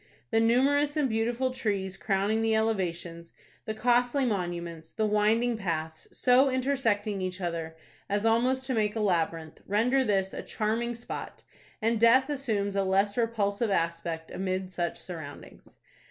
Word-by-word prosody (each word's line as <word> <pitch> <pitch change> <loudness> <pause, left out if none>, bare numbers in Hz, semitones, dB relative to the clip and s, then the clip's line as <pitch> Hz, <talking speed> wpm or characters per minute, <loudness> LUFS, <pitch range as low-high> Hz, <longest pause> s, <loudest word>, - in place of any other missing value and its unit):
The 225 - +3
numerous 280 +6 +3
and 295 -3 +2
beautiful 240 +3 0
trees 200 -7 -2
crowning 200 +2 0
the 225 0 +2
elevations, 175 -6 -2 0.3
the 220 - -3
costly 245 +4 +2
monuments, 175 -6 -3
the 220 - -1
winding 220 +3 +2
paths, 160 -5 -4
so 255 +2 +4
intersecting 235 -7 0
each 185 0 -3
other 165 -2 -4 0.3
as 205 +2 0
almost 250 +4 +2
to 260 - -2
make 215 -2 0
a - - -1
labyrinth, 165 -5 -1
render 245 +6 +2
this 195 -4 0
a - - -4
charming 230 +2 -2
spot, 235 - -7 0.4
and 225 0 +2
death 255 +4 +5
assumes 215 -8 -1
a 195 - +2
less 195 +2 +2
repulsive 225 -2 0
aspect 165 -2 -2
amid 185 0 -3
such 175 -2 -2
surroundings. 160 -5 -10
210 Hz, 145 wpm, -28 LUFS, 185-240 Hz, 0.4 s, death